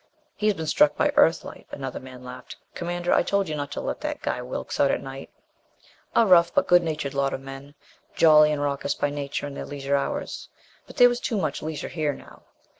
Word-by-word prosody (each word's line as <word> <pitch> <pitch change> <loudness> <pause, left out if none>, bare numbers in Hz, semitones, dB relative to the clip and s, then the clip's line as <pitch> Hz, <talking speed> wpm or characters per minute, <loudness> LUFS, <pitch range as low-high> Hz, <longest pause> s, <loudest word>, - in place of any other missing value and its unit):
"He's 210 -1 +1
been 160 - -5
struck 290 - +3
by 295 - +3
Earthlight," 165 - +2
another 135 -2 -6
man 130 -1 -12
laughed. 125 0 -9 0.2
"Commander, 175 0 -2
I - - +5
told 200 -1 0
you 155 - -3
not 145 -1 -4
to - - -4
let - - -4
that - - -3
guy 125 - -2
Wilks 125 +1 -5
out 140 - +4
at - - +1
night." 135 0 -9 0.9
A 230 - +5
rough 175 -3 +5
but - - +2
good 175 0 +5
natured 155 -4 -3
lot 140 0 0
of - - -8
men. 135 +2 -10 0.4
Jolly 150 -2 +6
and 145 -1 -1
raucous 140 -1 -1
by 145 - -1
nature 145 0 -4
in 145 - -6
their - - -6
leisure 140 -1 -2
hours. 140 - -3 0.4
But - - -13
there 245 - +8
was 245 0 -1
too 230 - -2
much 155 -7 -2
leisure 155 -1 -5
here 155 -3 -1
now. - - -14
145 Hz, 215 wpm, -25 LUFS, 140-175 Hz, 0.9 s, there